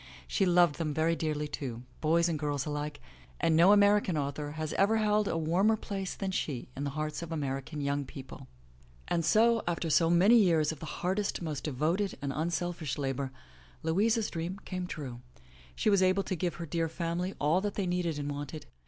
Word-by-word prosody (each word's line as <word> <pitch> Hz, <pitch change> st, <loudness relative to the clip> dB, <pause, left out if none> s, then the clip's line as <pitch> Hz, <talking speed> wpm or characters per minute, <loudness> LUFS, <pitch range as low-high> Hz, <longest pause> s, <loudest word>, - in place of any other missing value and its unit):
She 195 Hz, -, +1 dB
loved 175 Hz, -3 st, +4 dB
them 155 Hz, -3 st, -2 dB
very 165 Hz, +1 st, +2 dB
dearly, 150 Hz, -2 st, -2 dB
too, 125 Hz, -5 st, -5 dB, 0.2 s
boys 170 Hz, +2 st, +3 dB
and 160 Hz, -3 st, -1 dB
girls 145 Hz, -2 st, -1 dB
alike, 150 Hz, -1 st, -4 dB, 0.4 s
and 160 Hz, -, +3 dB
no 170 Hz, +5 st, +7 dB
American 205 Hz, -4 st, +4 dB
author 145 Hz, +1 st, -3 dB
has 155 Hz, 0 st, -4 dB
ever 210 Hz, +3 st, +3 dB
held 210 Hz, -1 st, +2 dB
a 165 Hz, -, 0 dB
warmer 180 Hz, +7 st, +2 dB
place 195 Hz, -2 st, -4 dB
than 195 Hz, -1 st, -3 dB
she 145 Hz, -8 st, -3 dB
in 140 Hz, -, -3 dB
the -, -, -1 dB
hearts 155 Hz, +1 st, -2 dB
of 170 Hz, -1 st, -7 dB
American 145 Hz, -1 st, -3 dB
young 140 Hz, 0 st, 0 dB
people. 130 Hz, 0 st, -10 dB, 0.6 s
And 170 Hz, -, +1 dB
so, 225 Hz, +7 st, +4 dB
after 170 Hz, -1 st, -1 dB
so 165 Hz, +2 st, +4 dB
many 190 Hz, +8 st, +6 dB
years 165 Hz, -8 st, +4 dB
of 160 Hz, -, -8 dB
the 160 Hz, -, -7 dB
hardest, 190 Hz, +3 st, -2 dB
most 150 Hz, -4 st, -4 dB
devoted 160 Hz, +8 st, 0 dB
and 140 Hz, -1 st, -3 dB
unselfish 165 Hz, -2 st, -2 dB
labor, 135 Hz, -1 st, -2 dB, 0.5 s
Louisa's 210 Hz, +7 st, +1 dB
dream 170 Hz, +4 st, -4 dB
came 185 Hz, -1 st, -4 dB
true. 130 Hz, -8 st, -6 dB, 0.5 s
She 215 Hz, -, +2 dB
was 200 Hz, -2 st, +4 dB
able 185 Hz, +1 st, +3 dB
to 190 Hz, -, -2 dB
give 175 Hz, 0 st, -2 dB
her 170 Hz, -, -5 dB
dear 165 Hz, +1 st, -1 dB
family 170 Hz, +3 st, -3 dB
all 155 Hz, +6 st, +2 dB
that 205 Hz, 0 st, -3 dB
they 200 Hz, -, -1 dB
needed 175 Hz, -3 st, -1 dB
and 145 Hz, 0 st, -3 dB
wanted. 145 Hz, +1 st, -6 dB
165 Hz, 195 wpm, -30 LUFS, 150-185 Hz, 0.6 s, no